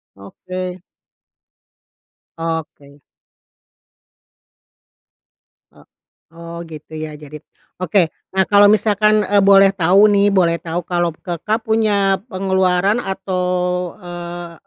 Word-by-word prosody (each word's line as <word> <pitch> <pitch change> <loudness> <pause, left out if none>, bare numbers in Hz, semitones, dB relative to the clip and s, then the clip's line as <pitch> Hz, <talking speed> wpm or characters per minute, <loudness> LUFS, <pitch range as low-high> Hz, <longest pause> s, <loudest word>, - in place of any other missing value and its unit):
Oke. 185 - -7 1.6
Oke. 155 -4 -6 2.7
E - - -26 0.6
oh, 170 0 -9
gitu 155 0 -12
ya. 155 0 -6
Jadi 150 0 -11 0.4
oke. 180 -1 +1 0.2
Nah 190 0 +3
kalau 205 0 +6
misalkan, 210 0 +3
eee, 205 0 +2
boleh 195 0 +6
tahu 195 +3 +4
nih, 200 0 +3
boleh 170 -3 +2
tahu 170 +1 -4
kalau 175 -1 -1
Kakak 180 +7 -3
punya 205 -3 +1
pengeluaran 190 0 +1
atau, 190 -3 -3 0.6
eee, 175 -1 -8
185 Hz, 95 wpm, -18 LUFS, 170-200 Hz, 2.7 s, kalau